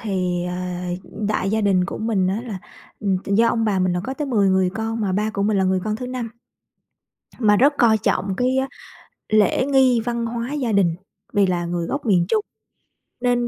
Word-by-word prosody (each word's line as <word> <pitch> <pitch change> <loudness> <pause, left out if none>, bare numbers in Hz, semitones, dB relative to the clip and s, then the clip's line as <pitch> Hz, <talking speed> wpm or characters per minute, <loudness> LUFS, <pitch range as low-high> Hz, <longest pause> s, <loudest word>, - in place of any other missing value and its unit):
thì, 180 -4 -1
ờ, 180 - -4 0.6
ừm, 210 -1 -4
đại 195 -2 0
gia 220 +1 +1
đình 190 -3 +2
của - - -5
mình 215 -4 0
á 195 +4 -1
là, 200 -5 -5 0.4
ừm, 195 -3 +1
do 220 +4 +3
ông 225 -1 +1
bà 200 -3 +1
mình 185 -1 +1
là 180 - -1
có 265 - -4
tới 295 +1 -3
10 205 -7 +2
người 190 -1 +2
con, 225 +1 -3
mà 195 -3 0
ba 210 +3 0
của 200 -1 -2
mình 205 -1 +2
là 190 - +2
người 185 0 +1
con 215 0 -1
thứ 250 +1 -6
5, 250 -2 -4 1.1
mà 210 -3 +4
rất 285 +5 +4
coi 220 -3 +5
trọng 195 -3 0
cái, 255 +3 +1
a, 265 0 0 0.6
lễ 215 +4 +3
nghi 265 -4 +4
văn 235 -1 -1
hóa 235 +4 -4
gia 255 -6 -1
đình, 180 -5 +2 0.4
vì 200 -1 +4
là 175 -1 -1
người 170 -1 -2
gốc 280 -2 -3
miền 180 -5 +3
Trung. 430 - +2 0.8
Nên 245 -1 +1
215 Hz, 220 wpm, -22 LUFS, 190-235 Hz, 1.1 s, coi